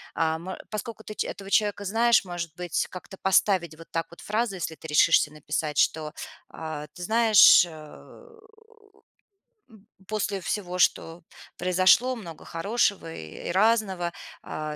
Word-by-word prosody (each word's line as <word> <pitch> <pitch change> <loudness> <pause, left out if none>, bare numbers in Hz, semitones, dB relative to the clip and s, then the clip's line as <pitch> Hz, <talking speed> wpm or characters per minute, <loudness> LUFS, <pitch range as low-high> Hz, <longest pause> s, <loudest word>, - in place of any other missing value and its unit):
Ам, 160 +2 -1
а, - - -5
поскольку 220 0 -6
ты 215 - -7
ч - - -2
этого 195 0 -8
человека 205 -1 +1
знаешь, 230 +2 +3
может 175 -3 -5
быть, 175 -2 -2
как-то 185 +1 -10
поставить 185 -4 +2
вот 165 - -13
так 165 0 -2
вот 170 - -15
фразу, 215 -1 -1
если 165 -3 -4
ты 160 - -11
решишься 150 0 +4
написать, 150 0 -4
что: 155 -1 +1 0.4
"А, 155 -2 -7
ты 180 - -9
знаешь, 220 -1 +7
э, 175 - -11 2.0
у - - -21
м 215 -1 -19 0.2
после 205 -2 -2
всего, 180 +1 -3
что 170 -1 +1 0.3
произошло, 185 +8 +3
много 170 -9 -10
хорошего 195 -1 -1
и, 80 - -9
э, - - -7
и - - 0
разного, 195 -3 +1 0.3
а, 155 0 -5
180 Hz, 155 wpm, -26 LUFS, 165-210 Hz, 2.0 s, знаешь